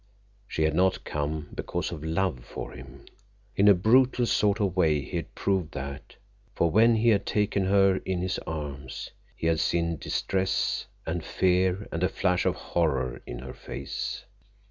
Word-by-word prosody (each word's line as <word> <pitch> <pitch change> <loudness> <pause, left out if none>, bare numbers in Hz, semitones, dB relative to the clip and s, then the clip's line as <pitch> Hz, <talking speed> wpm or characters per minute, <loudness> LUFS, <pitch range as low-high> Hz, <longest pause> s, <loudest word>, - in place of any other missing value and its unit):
She 80 - -1
had 80 0 +2
not 95 +3 +2
come 75 +1 -3
because 85 +1 -3
of 80 -3 -6
love 80 -5 -1
for - - -7
him. 65 0 -12 0.5
In 100 - +4
a 100 - +8
brutal 120 +6 +4
sort 105 -2 +2
of 100 -4 0
way 80 -5 +3
he - - -4
had - - -6
proved 95 -5 0
that, 70 0 -6 0.4
for 85 - +2
when 115 +4 +5
he 115 +1 +3
had 105 -3 +3
taken 105 -2 0
her 95 0 +4
in 95 -2 -2
his 90 -2 -1
arms, 70 -5 -5 0.2
he - - -6
had 80 -1 +2
seen 85 -1 +1
distress 95 +4 -1 0.2
and 80 +1 -2
fear 95 +2 +1
and 85 - -3
a 90 - +3
flash 90 -2 +1
of - - +1
horror 70 -7 -1
in - - -5
her 65 - -7
face. - - -5
90 Hz, 170 wpm, -27 LUFS, 80-95 Hz, 0.5 s, a